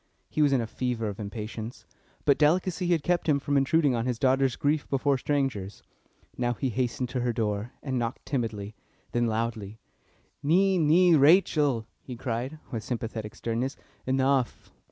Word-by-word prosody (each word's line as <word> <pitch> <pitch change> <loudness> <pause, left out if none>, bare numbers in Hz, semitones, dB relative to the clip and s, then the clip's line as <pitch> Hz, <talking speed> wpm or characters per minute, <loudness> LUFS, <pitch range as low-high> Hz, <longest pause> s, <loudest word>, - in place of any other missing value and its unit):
He 155 - 0
was 145 -2 +4
in 135 -3 +3
a - - -2
fever 115 -1 -2
of 100 - -7
impatience, 110 +2 -6 0.4
but 140 - +4
delicacy 180 +4 +2
had 170 -4 +2
kept 175 -2 +1
him 145 - +4
from 145 +1 -2
intruding 140 +1 +3
on 115 +1 -1
his 125 -2 -1
daughter's 135 0 +2
grief 145 +1 0
before 140 +1 +2
strangers. 125 -9 -2 0.6
Now 120 -1 +1
he 135 - -1
hastened 125 +1 -1
to 125 - -2
her 120 0 0
door, 110 0 -2
and 130 -3 -1
knocked 115 0 -4
timidly, 110 -6 -3 0.4
then 120 0 +1
loudly. 110 -2 -3 0.6
"Nee, 185 +5 +3
nee, 170 +3 +5
Rachel," 145 - +4 0.2
he 125 - -8
cried, 125 +4 -3
with 115 -3 -3
sympathetic 115 -3 -4
sternness, 120 +4 -2 0.3
"Enough!" 130 -1 +1
130 Hz, 160 wpm, -27 LUFS, 115-145 Hz, 0.6 s, nee